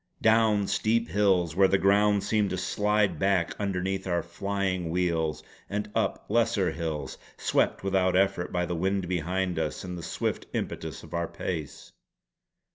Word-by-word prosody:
Down 110 Hz, -2 st, +4 dB
steep 115 Hz, +3 st, +1 dB
hills 95 Hz, -6 st, +2 dB
where 95 Hz, 0 st, +6 dB
the 95 Hz, -, +3 dB
ground 100 Hz, +1 st, +3 dB
seemed 105 Hz, -1 st, +1 dB
to 95 Hz, -, -2 dB
slide 105 Hz, -1 st, +1 dB
back 95 Hz, -2 st, +2 dB
underneath 95 Hz, -1 st, -2 dB
our 85 Hz, -2 st, 0 dB
flying 95 Hz, -1 st, -2 dB
wheels, 85 Hz, -3 st, 0 dB, 0.3 s
and 105 Hz, +1 st, -3 dB
up -, -, -1 dB
lesser -, -, +2 dB
hills, 75 Hz, -5 st, -4 dB, 0.2 s
swept -, -, +1 dB
without 95 Hz, -1 st, +2 dB
effort 95 Hz, -2 st, +1 dB
by 90 Hz, 0 st, 0 dB
the 90 Hz, -, -3 dB
wind 95 Hz, +2 st, 0 dB
behind 90 Hz, 0 st, -1 dB
us 80 Hz, -2 st, -3 dB
and 90 Hz, -1 st, -5 dB
the 85 Hz, -, -6 dB
swift -, -, -3 dB
impetus -, -, -4 dB
of -, -, -12 dB
our 85 Hz, 0 st, -1 dB
pace. 80 Hz, -6 st, -5 dB
95 Hz, 155 wpm, -28 LUFS, 85-100 Hz, 0.3 s, where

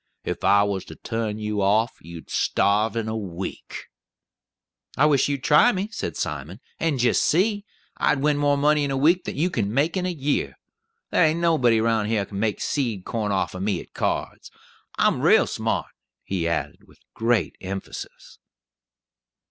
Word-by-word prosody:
If -, -, -4 dB
I 100 Hz, 0 st, +5 dB
was 100 Hz, -2 st, -2 dB
to 80 Hz, -, -10 dB
turn 115 Hz, 0 st, -3 dB
you 105 Hz, -1 st, -2 dB
off, 110 Hz, +5 st, +2 dB
you'd 85 Hz, 0 st, -11 dB
starve 105 Hz, +2 st, +1 dB
in 115 Hz, -1 st, -2 dB
a 110 Hz, -, -2 dB
week." 95 Hz, -4 st, -6 dB, 1.1 s
"I 150 Hz, -, +5 dB
wish 145 Hz, -2 st, +3 dB
you'd 140 Hz, -2 st, -2 dB
try 150 Hz, +11 st, +5 dB
me," 195 Hz, +1 st, -3 dB
said -, -, -4 dB
Simon, 75 Hz, -, -4 dB, 0.2 s
"and 160 Hz, -4 st, 0 dB
jist 120 Hz, -1 st, +2 dB
see. 205 Hz, +5 st, +1 dB, 0.3 s
I'd 140 Hz, -, +2 dB
win 145 Hz, +1 st, +2 dB
more 145 Hz, 0 st, +2 dB
money 150 Hz, +1 st, +3 dB
in 140 Hz, -, -1 dB
a 135 Hz, -, -1 dB
week 170 Hz, +6 st, +3 dB
than -, -, -5 dB
you 175 Hz, +5 st, +1 dB
can 105 Hz, -, -1 dB
make 145 Hz, -, +1 dB
in 185 Hz, -1 st, -1 dB
a -, -, -1 dB
year. 145 Hz, -3 st, -1 dB, 0.6 s
There -, -, +4 dB
ain't 160 Hz, +1 st, +2 dB
nobody 130 Hz, -10 st, +3 dB
round 110 Hz, -2 st, +1 dB
here 105 Hz, -3 st, 0 dB
kin 100 Hz, -1 st, -7 dB
make 110 Hz, -1 st, -1 dB
seed 115 Hz, -10 st, -2 dB
corn 110 Hz, -3 st, -2 dB
off 95 Hz, -, -1 dB
o' 90 Hz, -, -6 dB
me 95 Hz, -2 st, -1 dB
at -, -, -13 dB
cards. -, -, -3 dB, 0.5 s
I'm -, -, +2 dB
rale -, -, +5 dB
smart," -, -, -2 dB, 0.3 s
he 90 Hz, -4 st, -2 dB
added 85 Hz, -1 st, -3 dB
with -, -, -21 dB, 0.2 s
great 115 Hz, -1 st, 0 dB
emphasis. 95 Hz, +1 st, -8 dB
115 Hz, 180 wpm, -24 LUFS, 100-150 Hz, 1.1 s, I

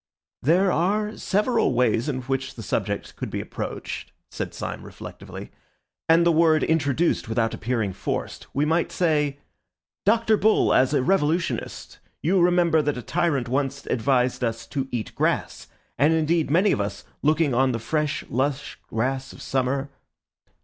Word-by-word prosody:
"There 180 Hz, +7 st, +3 dB
are 210 Hz, +6 st, 0 dB
several 210 Hz, -, +1 dB
ways 120 Hz, +2 st, +2 dB
in 130 Hz, -3 st, -2 dB
which 135 Hz, +1 st, -3 dB
the 115 Hz, -, -8 dB
subject -, -, -2 dB
could -, -, -5 dB
be -, -, -3 dB
approached," -, -, -6 dB, 0.2 s
said -, -, -4 dB
Syme -, -, -5 dB
reflectively, -, -, -10 dB, 0.6 s
"and 165 Hz, +1 st, +6 dB
the 170 Hz, -, +5 dB
word 160 Hz, -1 st, +4 dB
introduced 160 Hz, -3 st, +1 dB
without 115 Hz, 0 st, 0 dB
appearing 110 Hz, -4 st, -1 dB
forced. -, -, -4 dB
We 145 Hz, +2 st, +1 dB
might 165 Hz, +2 st, +1 dB
say, 150 Hz, -5 st, +1 dB, 0.7 s
'Dr. 220 Hz, 0 st, +4 dB
Bull, 220 Hz, +2 st, +3 dB
as 130 Hz, +3 st, +3 dB
a 130 Hz, -, +2 dB
revolutionist, 170 Hz, 0 st, -1 dB, 0.2 s
you 180 Hz, +4 st, +3 dB
remember 175 Hz, -2 st, +4 dB
that 145 Hz, -2 st, -1 dB
a 125 Hz, -, -6 dB
tyrant 165 Hz, -7 st, 0 dB
once 135 Hz, +2 st, -2 dB
advised 125 Hz, +1 st, +1 dB
us 115 Hz, -1 st, -2 dB
to 135 Hz, -2 st, -1 dB
eat 120 Hz, -3 st, -4 dB
grass; -, -, -1 dB, 0.3 s
and 150 Hz, +4 st, +4 dB
indeed 160 Hz, 0 st, +1 dB
many 185 Hz, +7 st, +4 dB
of -, -, +1 dB
us, 100 Hz, 0 st, -4 dB, 0.2 s
looking 155 Hz, -1 st, +2 dB
on 130 Hz, +2 st, +3 dB
the 120 Hz, -, -1 dB
fresh 150 Hz, +5 st, -2 dB
lush 135 Hz, +3 st, -2 dB
grass 130 Hz, +4 st, -2 dB
of -, -, -13 dB
summer... 135 Hz, +1 st, -1 dB
145 Hz, 155 wpm, -24 LUFS, 130-170 Hz, 0.7 s, and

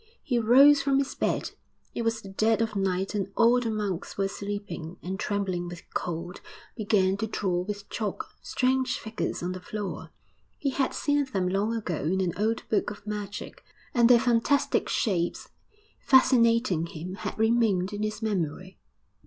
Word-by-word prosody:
He 245 Hz, -3 st, +1 dB
rose 275 Hz, +6 st, +7 dB
from 275 Hz, -1 st, +2 dB
his 275 Hz, -1 st, 0 dB
bed -, -, -1 dB, 0.4 s
it -, -, -3 dB
was 225 Hz, -1 st, -1 dB
the 195 Hz, -, -9 dB
dead 215 Hz, +2 st, +2 dB
of 225 Hz, -2 st, -1 dB
night 195 Hz, 0 st, 0 dB
and 195 Hz, -2 st, -2 dB
all 235 Hz, +2 st, +5 dB
the 240 Hz, -2 st, -2 dB
monks 205 Hz, -5 st, -3 dB
were 195 Hz, 0 st, +1 dB
sleeping 195 Hz, -4 st, -6 dB
and, 190 Hz, +2 st, -4 dB
trembling 190 Hz, -4 st, -2 dB
with 175 Hz, -1 st, -8 dB
cold, 175 Hz, +1 st, -4 dB, 0.3 s
began 200 Hz, -3 st, +2 dB
to 220 Hz, -, -2 dB
draw 190 Hz, -4 st, -1 dB
with 205 Hz, +2 st, -5 dB
chalk 215 Hz, -3 st, -4 dB
strange 255 Hz, 0 st, 0 dB
figures 220 Hz, -5 st, -4 dB
on 180 Hz, -, -1 dB
the 185 Hz, -, -5 dB
floor. 205 Hz, 0 st, -5 dB, 0.5 s
He 275 Hz, -, -1 dB
had 270 Hz, 0 st, 0 dB
seen 290 Hz, -1 st, +1 dB
them 195 Hz, -9 st, -1 dB
long 200 Hz, +5 st, 0 dB
ago 195 Hz, -8 st, -3 dB
in 180 Hz, +5 st, 0 dB
an 180 Hz, -3 st, 0 dB
old 220 Hz, +4 st, -1 dB
book 215 Hz, -, +1 dB
of 205 Hz, -1 st, -10 dB
magic, 210 Hz, -1 st, -6 dB, 0.3 s
and 235 Hz, -1 st, +5 dB
their 245 Hz, -1 st, +8 dB
fantastic 240 Hz, +4 st, +2 dB
shapes, 175 Hz, -7 st, -1 dB, 0.5 s
fascinating 230 Hz, -, +4 dB
him, 170 Hz, +3 st, -7 dB
had -, -, -5 dB
remained 220 Hz, -4 st, +2 dB
in 205 Hz, -, -4 dB
his 215 Hz, +1 st, -3 dB
memory. 185 Hz, -2 st, -3 dB
210 Hz, 170 wpm, -27 LUFS, 185-230 Hz, 0.5 s, their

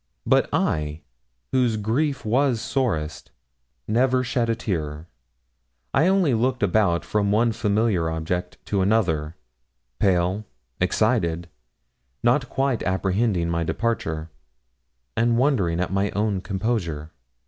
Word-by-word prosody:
But -, -, +3 dB
I, 75 Hz, +1 st, 0 dB, 0.5 s
whose 125 Hz, -4 st, +2 dB
grief 130 Hz, +7 st, -1 dB
was 125 Hz, +2 st, +2 dB
sorest, 100 Hz, -, -2 dB, 0.6 s
never 125 Hz, +3 st, +2 dB
shed 120 Hz, -1 st, 0 dB
a 115 Hz, -, +2 dB
tear. 80 Hz, -8 st, -3 dB, 0.9 s
I 155 Hz, +6 st, +4 dB
only 190 Hz, -7 st, +3 dB
looked 125 Hz, +1 st, +1 dB
about 95 Hz, -3 st, +2 dB
from 100 Hz, -1 st, 0 dB
one 115 Hz, +3 st, +3 dB
familiar 105 Hz, -5 st, +1 dB
object 85 Hz, +3 st, -3 dB
to 100 Hz, -2 st, 0 dB
another, 90 Hz, -7 st, +1 dB, 0.6 s
pale, 95 Hz, +1 st, +2 dB, 0.4 s
excited, 90 Hz, -3 st, +1 dB, 0.7 s
not 125 Hz, +2 st, +2 dB
quite 135 Hz, -3 st, 0 dB
apprehending 95 Hz, -1 st, 0 dB
my 85 Hz, 0 st, 0 dB
departure, 80 Hz, -6 st, -2 dB, 0.8 s
and 115 Hz, 0 st, +2 dB
wondering 110 Hz, -, +2 dB
at 90 Hz, +1 st, -1 dB
my 100 Hz, +1 st, +1 dB
own 100 Hz, -2 st, 0 dB
composure. 95 Hz, -7 st, -2 dB
105 Hz, 115 wpm, -24 LUFS, 85-120 Hz, 0.9 s, I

